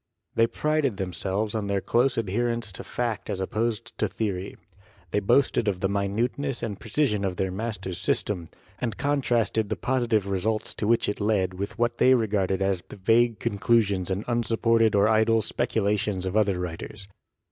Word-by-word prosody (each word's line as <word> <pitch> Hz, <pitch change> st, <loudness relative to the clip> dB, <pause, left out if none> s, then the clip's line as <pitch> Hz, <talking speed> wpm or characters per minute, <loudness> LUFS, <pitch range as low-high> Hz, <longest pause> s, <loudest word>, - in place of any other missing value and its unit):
They 115 Hz, -, +4 dB
prided 150 Hz, -5 st, 0 dB
themselves 95 Hz, +2 st, -2 dB
on 110 Hz, -2 st, -2 dB
their 100 Hz, -1 st, +1 dB
close 125 Hz, +6 st, +1 dB
adherence 115 Hz, +1 st, -1 dB
to 95 Hz, -, -7 dB
fact 115 Hz, -4 st, -3 dB
as 95 Hz, -, -2 dB
op 95 Hz, -, -3 dB
posed 115 Hz, +1 st, -2 dB
to -, -, +2 dB
theory. 100 Hz, -4 st, -3 dB, 0.5 s
They -, -, +2 dB
boasted 120 Hz, +2 st, +2 dB
of 95 Hz, -3 st, 0 dB
the 95 Hz, -, +1 dB
minuteness 115 Hz, +7 st, -1 dB
and 105 Hz, -4 st, -4 dB
precision 110 Hz, -3 st, 0 dB
of 95 Hz, -2 st, -1 dB
their 95 Hz, +1 st, -1 dB
master's 95 Hz, -3 st, -4 dB
system, 90 Hz, -5 st, -1 dB, 0.3 s
and 115 Hz, -5 st, -3 dB
contrasted 120 Hz, -6 st, +1 dB
the 110 Hz, -, 0 dB
positive 120 Hz, -5 st, +1 dB
results 100 Hz, +3 st, -1 dB
to 105 Hz, -, -3 dB
which 115 Hz, +1 st, +3 dB
it 105 Hz, -, -2 dB
led 100 Hz, -3 st, +1 dB
with 100 Hz, +5 st, -5 dB
what 120 Hz, 0 st, 0 dB
they 130 Hz, 0 st, +6 dB
regarded 100 Hz, -4 st, 0 dB
as 95 Hz, -2 st, 0 dB
the -, -, -9 dB
vague 115 Hz, +3 st, +3 dB
conclusions 100 Hz, -2 st, +1 dB
and 95 Hz, +2 st, -2 dB
unsupported 115 Hz, -2 st, +2 dB
or 100 Hz, +1 st, +5 dB
idle 110 Hz, 0 st, +3 dB
speculations 105 Hz, -5 st, 0 dB
of 95 Hz, +2 st, -3 dB
other 100 Hz, -4 st, +2 dB
writers. 90 Hz, +3 st, -6 dB
105 Hz, 170 wpm, -26 LUFS, 95-115 Hz, 0.5 s, they